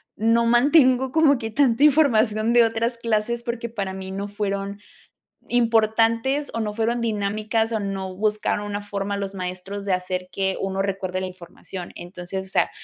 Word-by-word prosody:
no 230 Hz, +2 st, +2 dB
mantengo 255 Hz, +1 st, +4 dB
como 305 Hz, -4 st, +4 dB
que 225 Hz, -1 st, -5 dB
tanta 265 Hz, +2 st, +3 dB
información 235 Hz, -7 st, +4 dB
de 240 Hz, -1 st, +7 dB
otras 230 Hz, +1 st, 0 dB
clases 230 Hz, +1 st, -1 dB
porque 235 Hz, -1 st, -4 dB
para 200 Hz, -4 st, -4 dB
mí 190 Hz, 0 st, -7 dB
no 200 Hz, +1 st, -4 dB
fueron 200 Hz, -1 st, -3 dB, 0.7 s
importantes 230 Hz, +4 st, +2 dB
o 230 Hz, -, -1 dB
no 210 Hz, -1 st, -2 dB
fueron 230 Hz, +2 st, 0 dB
dinámicas 215 Hz, +1 st, -1 dB
o 220 Hz, -, 0 dB
no 195 Hz, -2 st, -4 dB
buscaron 210 Hz, +1 st, -1 dB
una 205 Hz, 0 st, -3 dB
forma 200 Hz, 0 st, -3 dB
los 200 Hz, 0 st, -4 dB
maestros 185 Hz, +2 st, -5 dB
de 195 Hz, -, -1 dB
hacer 180 Hz, 0 st, -2 dB
que 190 Hz, -1 st, -1 dB
1 195 Hz, 0 st, -1 dB
recuerde 190 Hz, -1 st, -2 dB
la -, -, -2 dB
información, 180 Hz, 0 st, -9 dB
entonces, 180 Hz, +2 st, -6 dB
o -, -, -13 dB
sea, -, -, +2 dB
215 Hz, 170 wpm, -23 LUFS, 195-235 Hz, 0.7 s, de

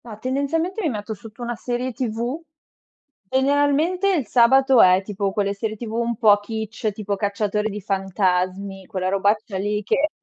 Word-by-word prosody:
Ma, 220 Hz, -3 st, -9 dB
tendenzialmente, 285 Hz, -, -1 dB
mi 320 Hz, -, +1 dB
metto 215 Hz, -2 st, -4 dB
sotto 220 Hz, +3 st, -11 dB
una 240 Hz, 0 st, -3 dB
serie 245 Hz, +3 st, -3 dB
TV. 240 Hz, +4 st, -3 dB, 0.9 s
Generalmente, 285 Hz, -, +2 dB
il 290 Hz, -, -1 dB
sabato 265 Hz, +3 st, +5 dB
è, 185 Hz, +1 st, +6 dB
tipo, 200 Hz, 0 st, -2 dB
quelle 200 Hz, 0 st, -1 dB
serie 215 Hz, +2 st, -3 dB
TV 220 Hz, 0 st, -7 dB
un 235 Hz, 0 st, -1 dB
po' 215 Hz, -3 st, +6 dB
Kitsch, 220 Hz, +1 st, -4 dB
tipo 205 Hz, 0 st, -3 dB
cacciatore 210 Hz, +1 st, -1 dB
di 210 Hz, 0 st, -6 dB
fantasmi, 190 Hz, 0 st, -1 dB
quella 185 Hz, -2 st, -2 dB
robaccia 200 Hz, +1 st, 0 dB
lì 210 Hz, +2 st, -1 dB
che 280 Hz, +9 st, +1 dB
220 Hz, 160 wpm, -22 LUFS, 200-255 Hz, 0.9 s, è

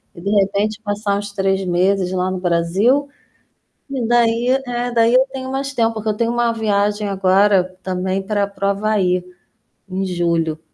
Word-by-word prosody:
e 170 Hz, -, -11 dB
de 200 Hz, -, -3 dB
repente 205 Hz, +1 st, +1 dB
passar 205 Hz, -1 st, -1 dB
uns 205 Hz, 0 st, -6 dB
3 195 Hz, -1 st, 0 dB
meses 185 Hz, +1 st, +1 dB
lá 185 Hz, 0 st, -1 dB
no 185 Hz, -, -3 dB
Brasil, 190 Hz, +11 st, +1 dB, 0.8 s
e 260 Hz, -4 st, -2 dB
daí 235 Hz, +1 st, +2 dB, 0.2 s
é 245 Hz, 0 st, -2 dB
daí 230 Hz, 0 st, +3 dB
eu 260 Hz, +1 st, +5 dB
tenho 260 Hz, -1 st, -6 dB
mais 275 Hz, +1 st, -3 dB
tempo, 230 Hz, -2 st, +1 dB
porque 220 Hz, 0 st, -3 dB
eu -, -, +1 dB
tenho 235 Hz, 0 st, 0 dB
uma 240 Hz, -1 st, +1 dB
viagem 210 Hz, -1 st, 0 dB
agora 195 Hz, 0 st, +3 dB, 0.2 s
também 185 Hz, +1 st, -2 dB
para 200 Hz, +1 st, 0 dB
para 200 Hz, 0 st, -4 dB
o -, -, +3 dB
Havaí, 195 Hz, -3 st, 0 dB, 0.7 s
em 190 Hz, +1 st, -2 dB
julho. 170 Hz, -3 st, -1 dB
200 Hz, 175 wpm, -19 LUFS, 185-230 Hz, 0.8 s, eu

